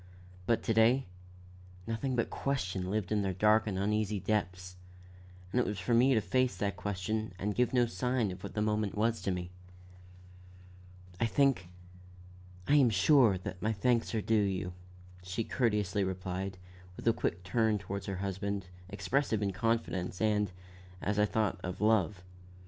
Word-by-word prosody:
But 115 - +2
to 115 - +1
day, 115 +4 +4 0.8
nothing 120 +4 -2
but 115 - 0
question 95 -9 -2
lived 105 -1 -2
in 105 -1 +2
their 95 -2 -1
dark 110 +3 +4
and 95 -3 -2
uneasy 105 +1 0
depths, 90 -2 -2 0.8
and 125 - +1
it 125 - +2
was 105 - -2
for 120 +6 -1
me 125 +3 +5
to 110 - +3
face 130 -2 +1
that 100 +1 -1
question 105 +2 -3
and 105 +3 -2
give 125 +3 +1
no 125 -2 +4
sign 115 0 -1
of 90 0 -9
what - - -8
the 105 - +1
moment 105 -1 -1
was 115 +2 +1
to - - -2
me. 90 -1 -3 1.7
"I 115 - +2
think 135 -8 +2 1.0
I 145 - +5
am 135 -4 +6
sure, 110 - +5
that 90 0 -7
my 110 +1 +1
thanks 115 +2 +1
are 110 - +1
due 115 - 0
you," 95 -3 -1 0.5
she 90 +5 -3
courteously 105 -5 0
replied, 95 0 -3 0.4
with - - -6
a 115 - +6
quick 90 -3 -2
turn 110 +3 +2
toward 100 0 -5
her 100 - -3
husband, 100 0 -3 0.2
expressive 105 +3 0
of 100 -1 -1
confidence, 95 -3 -1
and, 105 -3 +1 0.5
as 105 +2 -1
I 105 - +5
thought, 105 -5 0
of 90 0 -4
love. 105 -3 +2
105 Hz, 165 wpm, -32 LUFS, 95-115 Hz, 1.7 s, am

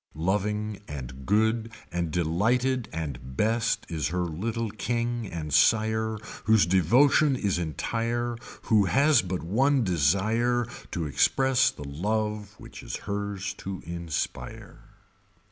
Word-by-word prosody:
Loving 105 +5 -1
and 65 -2 -8
good 110 +2 +2 0.2
and 85 -1 -1
delighted 110 +10 +1
and 70 -5 -6
best 115 +2 +1
is 80 -2 -2
her 90 +3 -1
little 110 +7 -3
King 120 0 -2
and 80 -4 -5
Sire 110 +6 +3 0.3
whose 110 -3 +5
devotion 130 - +4
is 100 -7 0
entire 115 +8 -2 0.3
who 105 -3 +3
has 140 +9 +4
but 90 -1 -4
one 130 +9 +2
desire 110 - +2 0.2
to 85 -3 -3
express 130 - +3
the 75 - -9
love 105 +6 -2
which - - -11
is - - -5
hers 100 -1 -3
to 95 -1 -6
inspire. 85 -2 -5
105 Hz, 120 wpm, -27 LUFS, 85-115 Hz, 0.3 s, whose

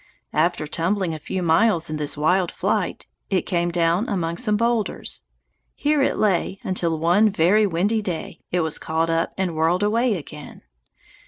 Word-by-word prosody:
After 155 - +1
tumbling 170 +3 -1
a 155 - -6
few 185 +4 -4
miles 170 +1 +3
in 155 - -2
this 150 -1 -2
wild 180 +4 +2
flight, - - -2 0.2
it 190 -3 +1
came 175 -1 0
down 170 +5 +1
among 170 -5 -2
some 210 -2 +1
boulders. 230 -1 -1 0.5
Here 300 0 +1
it - - +1
lay 195 -1 +1
until, 170 -3 -1
one 175 +7 +4
very 205 +3 +3
windy 200 +5 0
day, 175 -4 -5
it 180 - +1
was 160 -1 -1
caught 160 +1 -1
up 165 0 0
and 185 -4 -1
whirled 165 +5 +1
away 230 +2 +2
again. 150 -3 -9
180 Hz, 165 wpm, -22 LUFS, 165-210 Hz, 0.5 s, one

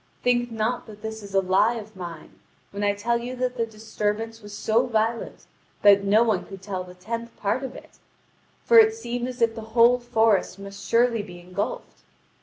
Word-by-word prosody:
Think 240 -1 +2
not 225 +3 -2
that 210 -1 -13
this 220 0 -5
is 200 -1 -8
a 195 - +5
lie 195 +5 +3
of 215 -2 -8
mine, 170 -4 -9 0.3
when 200 +1 -4
I 205 0 +2
tell 235 +3 0
you 245 +2 -5
that 250 0 -2
the 230 -2 -1
disturbance 220 +1 -3
was 205 0 -11
so 225 +4 +2
violent 225 0 -1 0.4
that 200 -1 +7
no 210 +3 +4
one 220 -5 +1
could 195 -1 -10
tell 190 -2 -4
the 180 0 -13
tenth 230 +5 -6
part 210 +5 -1
of 265 -2 -6
it: - - -14 0.6
for 470 - +7
it 440 0 +5
seemed 245 - -4
as 250 -2 -2
if 230 -1 +3
the 225 - -7 0.2
whole 240 +2 +6
forest 220 -6 +2
must 200 0 -9
surely 230 -1 +3
be 180 -4 -10
engulfed. 180 +4 -5
220 Hz, 200 wpm, -25 LUFS, 200-235 Hz, 0.6 s, that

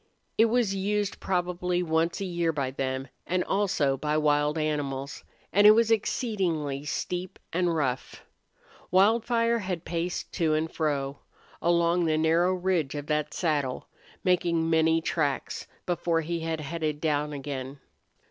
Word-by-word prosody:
It 225 - +5
was 230 -3 +2
used 200 +1 -1
probably 180 -1 -1
once 165 0 0
a - - -1
year 170 -2 0
by 140 -4 -2
them; 130 0 -3 0.2
and 180 0 +1
also 190 -9 +1
by 150 +2 0
wild 150 0 +2
animals, 145 -3 -2 0.3
and 205 +2 +7
it 215 - +9
was 230 0 +3
exceedingly 180 - 0
steep 180 +4 -3 0.2
and 175 -1 +1
rough. 130 -5 -2 0.7
Wildfire 230 +4 +3
had 185 -5 -4
paced 170 +1 -3
to 160 -4 +1
and 160 +1 -1
fro 140 -3 -1 0.4
along 170 0 +3
the 155 -1 +2
narrow 165 +4 +3
ridge 175 -6 0
of 145 -1 -4
that 150 0 -1
saddle, 145 -7 -1 0.3
making 170 -3 +2
many 160 0 +3
tracks, 145 -4 -2 0.2
before 170 -1 0
he 170 +2 -3
had 160 -1 -3
headed 155 0 -3
down 150 -1 0
again. 140 -1 -5
165 Hz, 140 wpm, -27 LUFS, 150-180 Hz, 0.7 s, it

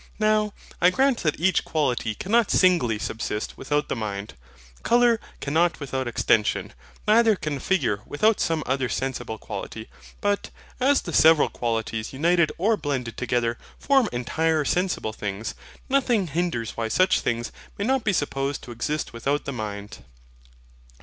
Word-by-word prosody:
Now, 215 -1 +2 0.3
I 180 - +7
grant 265 +5 +2
that 155 -4 0
each 185 +1 +2
quality 125 -8 -1
cannot 225 - +2
singly 170 - +3
subsist 110 0 -4
without 145 0 -1
the - - -2
mind. 105 -3 -4 0.5
Colour 240 -1 +4 0.2
cannot 165 +5 +1
without 135 -3 -3
extension, 105 -3 +1 0.3
neither 220 0 +5
can 150 -6 -4
figure 125 - 0
without 215 +9 +2
some 160 -2 0
other 130 -1 0
sensible 130 -2 -3
quality. 110 +1 -7 0.3
But, 205 0 0 0.3
as 275 +2 +3
the 170 - -6
several 160 -1 +6
qualities 115 -1 -3
united 170 +3 +2
or 215 +5 +2
blended 130 - -3
together 120 -1 -1 0.2
form 270 -5 +3
entire 155 +5 0
sensible 180 - 0
things, 105 +1 -4 0.3
nothing 250 -7 +2
hinders 150 -8 -1
why 115 -1 -2
such 185 - +3
things 120 0 -2 0.3
may 200 - -2
not 265 0 +1
be 205 - +2
supposed 140 -4 -1
to 120 - -9
exist 145 +6 -3
without 140 +5 -1
the 140 - -3
mind. 105 -3 -6
145 Hz, 145 wpm, -25 LUFS, 115-190 Hz, 0.5 s, I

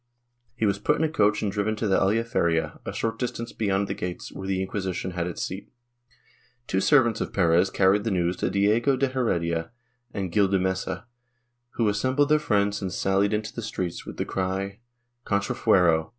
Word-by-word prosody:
He 110 - 0
was 100 - +1
put 150 - +2
in 160 - -1
a - - +3
coach 105 -10 +2
and 100 - 0
driven 105 +2 -1
to 110 0 -2
the 95 - +3
Aljaferia, 95 -6 +1
a - - -2
short 115 0 -3
distance 120 -2 -3
beyond 100 -2 0
the - - -2
gates, 90 -1 -5
where 95 - -7
the 95 -1 0
Inquisition 95 -1 -3
had 85 -1 -2
its 90 - -4
seat. 95 +2 -6 0.9
Two 95 - 0
servants 120 -5 +4
of - - -3
Perez 90 0 +3
carried 100 +2 +3
the 115 - -1
news 90 -2 0
to - - 0
Diego 110 +7 +2
de 135 +1 +1
Heredia 85 -10 -1 0.4
and 95 -3 -4
Gil 100 +2 +3
de 95 0 +2
Mesa, 95 +1 -2 0.7
who 115 - +1
assembled 130 +8 +1
their 150 0 +5
friends 100 -7 +1
and 95 -2 -3
sallied 95 +2 +1
into 105 +1 -2
the 115 - -5
streets, 90 -6 -4
with - - -9
the - - -1
cry, 95 +1 -3 0.4
Contrafuero! 90 -5 +2
100 Hz, 190 wpm, -26 LUFS, 95-110 Hz, 0.9 s, their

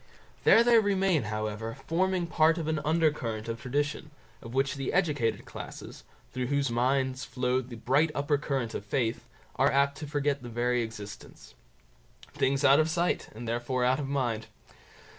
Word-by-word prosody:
There 230 - +7
they 235 -1 +6
remain, 195 - +2
however, 110 +1 -3
forming 185 +1 +1
part 160 0 +3
of 160 -2 -3
an 160 -1 0
under 160 +1 +3
current 115 -7 -5
of 115 0 -4
tradition, 145 +4 -2 0.3
of 115 +2 -9
which 135 0 +1
the 135 -2 -3
educated 145 - 0
classes, - - -9 0.3
through 125 0 -2
whose 140 -2 0
minds 130 +2 +1
flows 125 0 -1
the 120 - -8
bright 135 +8 +2
upper 145 0 +1
current 135 -6 -2
of - - -4
faith, 115 +2 -2 0.3
are - - +4
apt 140 +1 +2
to 150 - -6
forget 145 -1 -1
the 120 - -8
very 120 +1 0
existence. 110 -3 -9 0.8
Things 140 +1 +1
out 140 +1 +7
of 155 +1 +2
sight, 175 +2 0
and 120 +1 -7
therefore 120 +2 -1
out 130 +2 +2
of 140 - -3
mind. 120 -6 -1
135 Hz, 170 wpm, -29 LUFS, 120-150 Hz, 0.8 s, There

